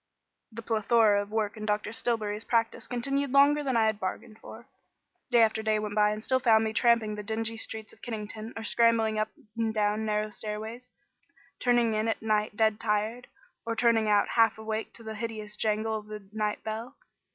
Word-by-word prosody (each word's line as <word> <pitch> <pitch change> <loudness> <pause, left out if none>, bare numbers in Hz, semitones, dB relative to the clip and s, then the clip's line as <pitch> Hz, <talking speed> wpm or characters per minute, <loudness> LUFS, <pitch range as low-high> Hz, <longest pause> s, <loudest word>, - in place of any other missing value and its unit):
The 230 +1 -8
plethora 220 -1 +3
of 205 - -7
work 215 -1 -1
in 215 0 -6
Dr. 210 0 -1
Stillbury's 215 -2 -1
practice 230 -1 0
continued 275 +3 -1
longer 285 +2 +5
than 260 -4 0
I 225 - +4
had 215 -1 0
bargained 215 +4 -5
for. 230 +1 -11 0.6
Day 240 -2 +5
after 220 0 +1
day 220 0 +1
went 210 -1 -3
by 210 0 +4
and 215 +1 -4
still 260 +1 +2
found 225 -3 +4
me 220 0 -2
tramping 230 -2 +3
the 210 - -5
dingy 225 +1 -3
streets 220 -1 -6
of - - -21
Kennington 220 -1 -6
or 225 - -5
scrambling 225 -2 +2
up 215 0 0 0.3
and 225 -1 0
down 210 0 0
narrow 215 0 -1
stairways; 220 +4 -6 0.7
turning 240 -2 +3
in 215 +1 0
at 225 - 0
night 215 -1 0
dead 220 -1 +2
tired, 220 +3 -1 0.4
or 230 0 -3
turning 225 -2 +3
out 205 -1 +3
half 225 -2 +3
awake 220 0 -4
to 230 - -11
the 220 0 -6
hideous 215 -1 -5
jangle 220 0 0
of 210 - -15
the 210 -2 -9
night 210 -1 -2
bell. 225 +3 -5
220 Hz, 195 wpm, -28 LUFS, 215-230 Hz, 0.7 s, longer